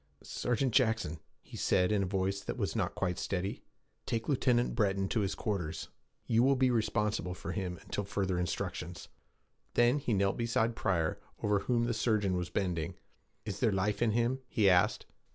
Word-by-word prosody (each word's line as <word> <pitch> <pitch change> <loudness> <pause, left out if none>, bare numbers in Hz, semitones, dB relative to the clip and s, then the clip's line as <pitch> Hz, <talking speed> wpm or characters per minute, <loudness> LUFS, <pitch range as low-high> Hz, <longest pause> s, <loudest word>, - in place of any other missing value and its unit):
'Sergeant 125 0 -1
Jackson,' 110 - +2 0.2
he - - -12
said, 90 +2 +2
in 105 -2 +2
a 95 - 0
voice 95 +1 -1
that - - -5
was - - -1
not - - -1
quite 90 -2 -1
steady, 95 +1 -2 0.5
'take 115 -1 -1
Lieutenant 125 -3 +2
Breton 100 -4 +1
to 115 - +1
his 100 -2 0
quarters. 95 -8 -3 0.4
You 115 0 +3
will 135 +2 +4
be 130 -1 +3
responsible 105 -5 0
for 90 - -5
him 90 -3 -3
until 105 - -3
further 95 -3 -1
instructions.' 90 -1 -4 0.7
Then 120 +4 +4
he 120 -5 0
knelt 100 0 +1
beside 115 0 +1
Pryor, 85 -8 0 0.2
over 105 -1 +3
whom 120 +2 +1
the 120 0 0
surgeon 105 -5 +1
was 90 -1 -2
bending. 90 -6 -2 0.5
'Is 100 -2 -4
there 115 - +3
life 100 +2 0
in 120 - +4
him?' 120 +3 +1
he 110 -4 +2
asked. 90 -2 +4
105 Hz, 175 wpm, -32 LUFS, 95-115 Hz, 0.7 s, will